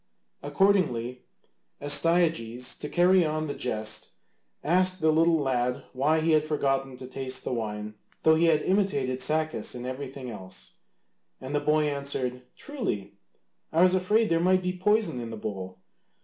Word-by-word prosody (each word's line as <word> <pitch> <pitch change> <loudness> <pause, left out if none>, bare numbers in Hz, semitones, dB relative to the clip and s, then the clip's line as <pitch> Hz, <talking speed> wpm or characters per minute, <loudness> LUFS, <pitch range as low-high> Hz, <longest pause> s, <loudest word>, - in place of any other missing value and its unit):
Accordingly, 145 -7 +1 0.6
Astyages, 145 -5 +2
to 150 - -5
carry 180 +1 +4
on 155 0 -1
the 145 - -3
jest, 110 -5 -4 0.5
asked 185 +3 +2
the 160 -1 +3
little 165 +1 +4
lad 125 -3 -1
why 150 +5 +2
he 165 +1 +2
had 155 -1 +4
forgotten 135 -3 -1
to 130 - -9
taste 130 0 -5
the - - -3
wine 105 -2 -4 0.3
though 160 - +6
he 160 +2 +3
had 160 -2 +3
imitated 160 -10 0
Sacas 155 +2 -1
in 125 0 -6
everything 130 -1 -6
else. 95 - -10 0.6
And 130 +2 -7
the 145 - +2
boy 150 +1 +2
answered, 140 -3 -3 0.2
"Truly, 105 - -4 0.6
I 165 +2 +4
was 185 0 +5
afraid 210 +4 +2
there 165 - +2
might 185 +2 +3
be 180 0 -1
poison 210 - +1
in 115 - -6
the 110 - -6
bowl. 95 -3 -6
145 Hz, 155 wpm, -27 LUFS, 125-170 Hz, 0.6 s, though